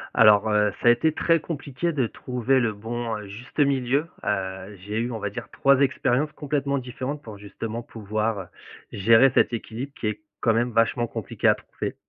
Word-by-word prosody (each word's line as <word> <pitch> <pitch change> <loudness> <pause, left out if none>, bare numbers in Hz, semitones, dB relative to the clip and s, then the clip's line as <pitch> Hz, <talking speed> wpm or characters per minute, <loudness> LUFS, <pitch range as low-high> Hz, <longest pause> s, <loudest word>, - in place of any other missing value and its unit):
Alors, 105 -2 +6
heu, 105 0 +3
ça 120 - +5
a - - +10
été 155 +7 +2
très 165 +1 +2
compliqué 155 +1 -3
de 135 -6 +1
trouver 125 +2 0
le 115 -3 +1
bon, 115 +2 -4
heu, 105 - -8
juste 110 +6 -12
milieu. 140 +1 +2 0.2
Heu, 95 0 -3
j'ai 105 +3 -3
eu, 120 +2 -1
on 115 - -3
va 105 - -2
dire, - - -7
3 140 -1 +3
expériences 140 +1 +1
complètement 140 -1 -1
différentes 130 +3 -5
pour, 110 -5 -9
justement, 110 +3 -6
pouvoir 110 -3 -3 0.4
gérer 115 +6 +5
cet - - +3
équilibre, 120 +4 -5
qui 110 - -1
est 105 - -3 0.2
quand 115 - +3
même 120 +2 +1
vachement 115 +1 +2
compliqué 110 -4 -2
à - - +6
trouver. - - -6
120 Hz, 190 wpm, -25 LUFS, 105-135 Hz, 0.4 s, a